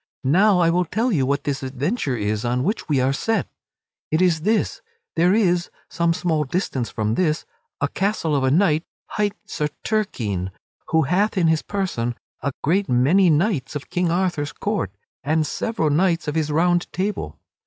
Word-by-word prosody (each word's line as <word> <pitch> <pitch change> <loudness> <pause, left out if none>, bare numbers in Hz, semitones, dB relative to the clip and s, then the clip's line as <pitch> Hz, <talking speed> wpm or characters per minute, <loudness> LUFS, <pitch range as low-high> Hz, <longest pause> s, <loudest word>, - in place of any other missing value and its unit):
Now 185 +9 +4
I 170 -2 +4
will 180 +1 +2
tell 230 +8 0
you 140 -9 +1
what 140 +1 0
this 140 -2 -2
adventure 135 - -2
is 105 +1 -1
on 125 +1 0
which 205 +2 -2
we 145 -3 +3
are 130 +2 +2
set; 220 +6 0 0.6
it 155 - +1
is 175 -4 +3
this 220 - 0 0.3
there 175 +4 +4
is, 180 -5 +2 0.2
some 170 -1 +1
small 165 -3 0
distance 130 - -2
from 110 0 -1
this, 155 +2 0 0.3
a - - +1
castle 195 -6 0
of 135 - +1
a 130 - +3
knight 160 +1 +3 0.3
hight 205 -1 0
Sir 150 -7 -2 0.2
Turquine, 110 - -1 0.4
who 160 0 +3
hath 195 +8 +1
in 180 - +3
his 160 -1 +2
prison 150 - -2 0.3
a 140 - -1
great 190 +6 +1
many 150 +10 +4
knights 155 - +1
of 145 - -6
King 180 -1 +1
Arthur's 170 -4 0
court, 205 - -2 0.3
and 155 +2 +1
several 160 -4 -1
knights 170 +1 +2
of 150 - -1
his 155 -1 0
Round 175 +3 +2
Table. 185 - -3
165 Hz, 175 wpm, -22 LUFS, 140-190 Hz, 0.6 s, Now